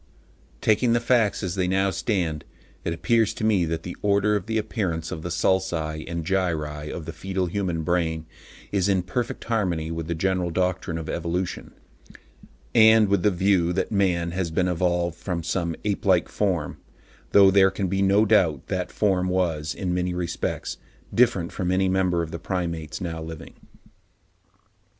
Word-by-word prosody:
Taking 115 +2 +3
the 120 - +3
facts 120 -3 +2
as 90 -2 -2
they 90 -1 0
now 95 +1 +2
stand, 85 -9 -1 0.4
it - - -2
appears 110 +6 +1
to - - -5
me 105 -5 +3
that 80 0 -3
the 90 - -6
order 100 +1 +2
of 100 -2 -3
the 110 0 0
appearance 95 -7 -2
of 80 - -5
the 90 - -5
sulci 85 -3 0
and 85 -2 -3
gyri 80 -5 -1
in 85 - -6
the 85 - -7
foetal 95 +3 -2
human 90 -3 -2
brain 80 -1 0 0.5
is 100 -1 +1
in 95 -2 +2
perfect 120 +6 -3
harmony 90 -8 -1
with 80 -1 -4
the 85 - -2
general 90 +1 0
doctrine 90 -1 -1
of 80 -1 -6
evolution, 85 +3 -3 1.0
and 110 -1 +6
with 100 -2 +2
the 105 - +4
view 90 -2 +2
that 95 - -1
man 90 -4 +1
has 90 -1 -2
been 90 +3 0
evolved 85 -1 0
from 85 -3 -3
some 85 0 -1
ape 100 -2 -1
like 90 -3 +3
form; 90 -8 -1 0.5
though 100 -1 +7
there 95 0 +6
can 95 +1 -3
be 95 +2 0
no 100 +2 +4
doubt 90 -10 +3
that 90 -1 -2
form 95 -3 +1
was, 85 -4 -1
in 90 -3 -2
many 90 0 -1
respects, 90 -1 -3 0.4
different 115 -8 +2
from 90 -2 -2
any 95 +1 +2
member 95 -2 +1
of 80 - -7
the 85 - -5
Primates 85 -4 -3
now 80 -2 -4
living. 80 -1 -8
90 Hz, 175 wpm, -24 LUFS, 85-100 Hz, 1.0 s, though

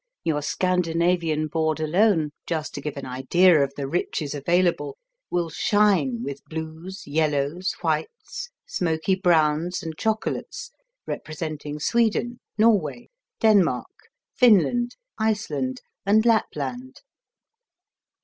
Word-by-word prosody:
Your 150 -3 0
Scandinavian 170 -2 +1
board 160 0 -1
alone, 160 0 +2 0.2
just 160 -3 -2
to - - -5
give 150 -2 -5
an 140 - -5
idea 145 +6 +4
of 140 - -2
the 140 -1 -3
riches 150 -1 -2
available, 175 - +1 0.3
will 170 -2 -1
shine 170 - +2
with 140 +1 -6
blues, 160 +4 -7
yellows, 150 +3 0
whites, 470 +1 -3 0.2
smoky 175 - 0
browns, 170 -2 +2
and 160 -1 -5
chocolates 220 0 -2 0.3
representing 155 -2 -5
Sweden, 235 +5 +1 0.2
Norway, 215 -3 +2 0.3
Denmark, 200 - +2 0.2
Finland, 240 +1 +4 0.2
Iceland 150 -12 -1 0.2
and 215 +3 +3
Lapland. 135 - -1
165 Hz, 100 wpm, -24 LUFS, 150-200 Hz, 0.3 s, idea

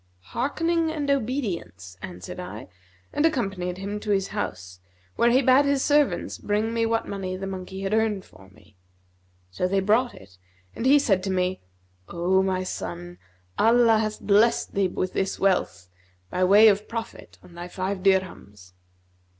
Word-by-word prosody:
'Hearkening 330 +6 0
and 290 -3 -1
obedience,' 215 - -3
answered 90 - -8
I 180 0 -8 0.5
and 295 - 0
accompanied 195 - -1
him 200 +2 -4
to 210 - -7
his 195 -1 +1
house, 90 - -5 0.4
where 235 - +3
he 255 +3 +3
bade 260 +3 +5
his 280 -1 +1
servants 295 -1 +1
bring 210 +2 -1
me 230 -1 +1
what 225 0 -1
money 190 -2 -4
the 195 - -5
monkey 190 0 -6
had 195 +1 -2
earned 220 -3 0
for 95 0 -18
me. 100 0 -23 0.7
So 140 - -1
they 195 +1 +1
brought 220 +6 +1
it 95 -1 -16 0.4
and 250 - -1
he 285 +2 +7
said 200 -10 +2
to - - -2
me, 185 0 -1 0.5
'O 180 +2 +1
my 190 -1 -1
son, 90 - -6 0.4
Allah 230 0 +5
hath 215 -1 -2
blessed 215 +3 +2
thee 195 -1 +2
with 185 0 -3
this 190 - -2
wealth, 185 - 0 0.4
by 185 - 0
way 205 +4 +7
of 210 0 +2
profit 230 0 -7
on 175 - -16
thy 175 +1 -7
five 185 +1 -4
dirhams.' 175 - -1
195 Hz, 165 wpm, -25 LUFS, 180-230 Hz, 0.7 s, he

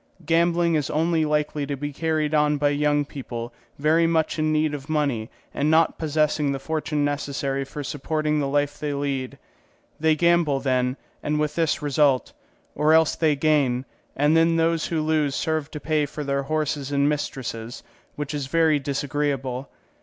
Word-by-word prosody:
Gambling 170 +1 +2
is 150 -3 0
only 160 +1 +1
likely 150 -1 -1
to 140 -1 -3
be 145 +1 -4
carried 155 0 -1
on 150 -1 +3
by 145 0 +2
young 145 0 +1
people 120 -4 -7 0.2
very 160 +3 +3
much 160 -1 0
in 155 0 +1
need 155 -1 +1
of 140 0 -7
money 140 -8 0 0.2
and 150 - 0
not 160 +1 +3
possessing 150 -2 +1
the 135 - -2
fortune 150 0 -1
necessary 140 -1 -2
for 145 +2 -7
supporting 150 +2 -1
the 140 - 0
life 145 +1 0
they 145 -1 -2
lead; 140 -2 -3 0.6
they 160 0 +3
gamble, 170 -3 +3
then, 130 -1 0 0.2
and 150 0 -1
with 150 0 0
this 165 -2 0
result; 145 -2 +2 0.4
or 155 +1 +3
else 160 -1 +4
they 155 -3 +2
gain, 140 -4 +1 0.3
and 145 +3 +3
then 165 0 +4
those 165 0 +1
who 160 -2 -1
lose 155 -3 +1
serve 155 -2 -1
to 150 - -7
pay 155 -1 0
for 150 +1 -6
their 140 0 0
horses 150 -1 -2
and 140 0 +2
mistresses, 125 -5 -4 0.3
which 150 +1 -4
is 145 -3 -3
very 160 0 +3
disagreeable. 140 -2 -2
150 Hz, 170 wpm, -24 LUFS, 140-155 Hz, 0.6 s, else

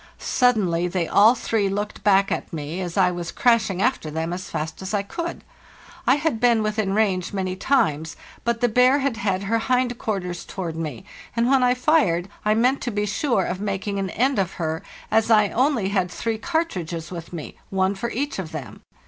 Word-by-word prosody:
Suddenly 190 -9 +2
they 175 -2 -1
all 215 +5 +6
three 220 -4 0
looked 205 +2 -4
back 195 -1 +4
at - - -3
me, 160 +2 -4
as 175 -1 -5
I 185 -2 +4
was 175 -1 -5
crashing 215 -6 +2
after 155 - 0
them 160 +2 -3
as 185 +1 -6
fast 160 +4 -4
as 190 +3 -3
I 200 - 0
could. 335 - -5 0.6
I 255 - +6
had 295 -5 -1
been 235 -2 +3
within 215 -2 0
range 195 -4 +1
many 185 -2 -2
times, 160 - +1 0.3
but 235 -1 -1
the 245 - +4
bear 250 +4 +4
had 275 -4 -1
had 195 -3 -1
her 225 +3 +1
hind 250 0 0
quarters 180 -5 -3
towards 175 -4 -5
me, 150 -8 -5 0.3
and 230 0 +2
when 270 0 +4
I 250 0 +4
fired 230 - +2
I 215 0 +3
meant 250 +5 +2
to 240 - -2
be 205 0 -1
sure 210 -1 0
of 185 +2 -3
making 200 0 -2
an 195 -1 -2
end 260 +2 +1
of 185 -3 -1
her, 160 -1 -3 0.3
as 220 +1 +3
I 210 -2 +5
only 245 -5 +1
had 190 -3 0
three 220 +4 -3
cartridges 185 - -2
with 170 -2 -7
me, 165 -4 -7
one 190 0 +1
for 220 +4 -4
each 275 0 -3
of 170 -4 -5
them. 135 -10 -7
200 Hz, 200 wpm, -23 LUFS, 180-235 Hz, 0.6 s, all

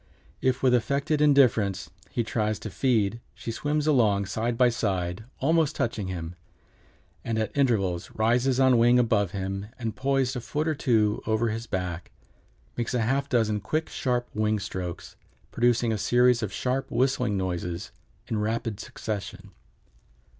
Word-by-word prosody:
If 130 0 0
with 130 -1 +4
affected 140 +5 +1
indifference 120 -10 +3 0.2
he 120 - -1
tries 110 -1 -1
to 110 - -6
feed 115 +1 +1
she 115 - -5
swims 150 +5 -1
along 110 -9 +3
side 115 +4 -2
by 125 -1 +5
side, 95 -3 -2
almost 160 +1 +2
touching 110 -4 -2
him, 85 -2 -5 0.9
and 115 -1 -2
at 110 -1 -2
intervals 100 -11 +1
rises 120 +4 +2
on 130 -2 +5
wing 120 +1 +5
above 110 -5 +2
him 95 +1 -4
and, 115 -3 -4
poised 135 0 0
a 125 - -3
foot 150 +6 -2
or 160 - +2
two 110 -7 +1
over 110 +1 +1
his 115 +2 -4
back, 90 -2 -4 0.7
makes 120 +1 -2
a 120 - +1
half 135 +5 0
dozen 110 -4 +1
quick, 155 +10 -2
sharp 125 -2 -1
wing 110 0 +1
strokes, 90 -3 -6 0.4
producing 120 -1 +2
a 105 - -2
series 125 +2 +3
of 105 -3 -3
sharp, 130 +5 -2
whistling 125 -5 +1
noises 90 +1 -3 0.4
in 110 -3 -1
rapid 110 0 -2
succession. 100 -3 -6
115 Hz, 155 wpm, -26 LUFS, 100-125 Hz, 0.9 s, by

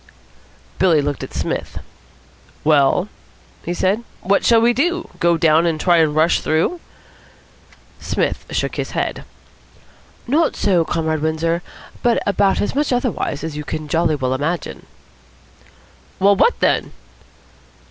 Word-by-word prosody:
Billy 175 -5 +4
looked 145 -1 -2
at - - -7
Psmith. - - -4 0.9
"Well?" 150 +4 +3 0.6
he 170 - -4
said. 195 +6 0 0.2
"What 200 +2 +1
shall 230 -1 +5
we 235 +1 +3
do? 345 +7 0
Go 170 -1 +3
down 160 +1 +3
and 160 -2 -1
try 175 0 +3
and 155 -2 +2
rush 160 +2 +3
through?" 165 - 0 1.2
Psmith - - -2
shook - - -2
his - - -4
head. - - -2 1.0
"Not 300 +6 +1
so, 180 -5 +2
Comrade 160 -2 -2
Windsor, 160 +2 -1 0.4
but 240 -1 +2
about 200 -1 +2
as - - -2
much 290 +1 0
otherwise 245 - -1
as 160 -2 -5
you 150 - -5
can 155 0 -5
jolly 160 0 +1
well 130 -2 -1
imagine." 150 +6 -3 1.3
"Well, 200 +1 +4
what 470 - +2
then?" - - +1
170 Hz, 135 wpm, -19 LUFS, 155-205 Hz, 1.3 s, shall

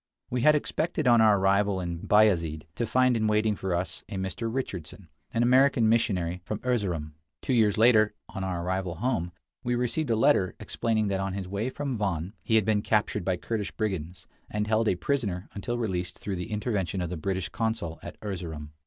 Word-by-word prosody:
We 125 0 0
had 150 +3 +6
expected, 155 0 -1
on 120 -2 +6
our 110 -2 +6
arrival 100 0 +2
in 85 -2 -4
Bayazid, 85 -7 +3
to 115 +5 -2
find 130 -1 +3
in 110 -1 +1
waiting 105 0 +2
for 95 -2 -2
us 90 0 -3
a 105 - -5
Mr. 95 +4 -3
Richardson, 95 - -5 0.2
an 115 - +1
American 130 -1 +4
missionary 90 -6 +1
from 105 +3 -3
Erzerum. 90 -12 -1 0.3
Two 130 - 0
years 110 -3 +3
later, 110 -2 +5
on 95 -2 -6
our 90 -2 -2
arrival 95 -2 -2
home, 90 -4 -1 0.3
we 125 0 0
received 125 +4 -1
a 115 - +3
letter 95 -4 +3
explaining 110 -2 0
that 95 -1 0
on 95 0 -2
his 95 -1 -4
way 100 +6 -2
from 130 -3 -3
Van 95 -2 -2
he 110 - +1
had 110 -3 +4
been 105 -1 +2
captured 105 -3 +1
by 90 0 0
Kurdish 105 +1 -3
brigands, 90 -5 -3 0.2
and 105 0 -1
held 110 +1 +1
a - - +3
prisoner 100 -4 -2
until 120 +4 -3
released 90 -6 -2
through 100 -3 -4
the 90 +5 -5
intervention 105 -4 -1
of 90 -1 -3
the - - -2
British 95 +2 -2
consul 110 -8 -2
at - - -9
Erzerum. 85 -7 -5
105 Hz, 195 wpm, -27 LUFS, 90-115 Hz, 0.3 s, had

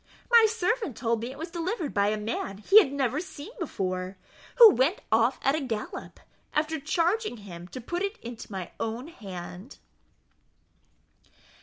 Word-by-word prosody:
My 465 -2 +8
servant 435 - -1
told 230 -2 0
me 235 - -4
it 265 - -9
was 325 +3 -6
delivered 345 - -3
by 200 0 +3
a 215 +1 +1
man 210 -2 -3
he 385 - +7
had 335 -11 +2
never 275 0 0
seen 360 0 -8
before, 185 - -3 0.4
who 465 -3 +10
went 300 +5 +2
off 230 +4 +3
at 270 - +4
the 310 +2 -1
gallop, 225 -6 -5 0.4
after 310 +1 0
charging 340 - 0
him 175 -4 -10
to 255 - -8
put 345 +9 -4
it 400 +2 -2
into 235 -2 -9
my 190 -3 -5
own 230 +6 -3
hand." 190 - -9
265 Hz, 160 wpm, -27 LUFS, 215-345 Hz, 0.4 s, who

